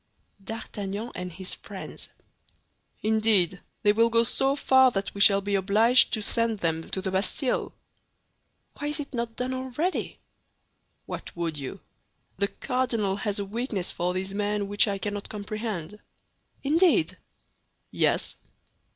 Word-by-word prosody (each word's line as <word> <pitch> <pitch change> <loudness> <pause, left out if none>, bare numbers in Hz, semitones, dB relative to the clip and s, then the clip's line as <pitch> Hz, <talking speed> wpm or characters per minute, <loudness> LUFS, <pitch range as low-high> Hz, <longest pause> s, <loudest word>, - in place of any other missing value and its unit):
"D'Artagnan 215 0 -5
and 180 0 -5
his 185 +2 -6
friends." - - -8 0.9
"Indeed, 215 -5 +3 0.2
they 205 - +6
will 230 +2 +4
go 230 0 +4
so 270 +4 +2
far 260 -2 +5
that 195 -4 -3
we 200 - -3
shall 200 -1 +8
be 200 +1 -3
obliged 215 +6 +5
to 215 - +1
send 230 0 +1
them 165 -3 -2
to 190 - -3
the 190 - -2
Bastille." 210 +7 0 1.1
"Why 290 - -2
is 295 +1 -1
it 280 -1 -6
not 235 -2 -3
done 250 +2 -2
already?" 260 +8 -2 0.9
"What - - -6
would 165 -2 -2
you? 135 - -7 0.6
The 200 +1 +2
cardinal 235 -6 -1
has 205 -1 -2
a 200 - -2
weakness 215 -3 -3
for 180 +1 -2
these 190 +1 -3
men 205 0 -1
which 205 +2 +4
I 200 -1 -1
cannot 205 0 -4
comprehend." 210 -2 -5 0.6
"Indeed!" 330 +3 +3 0.7
"Yes." - - +1
210 Hz, 140 wpm, -27 LUFS, 195-240 Hz, 1.1 s, shall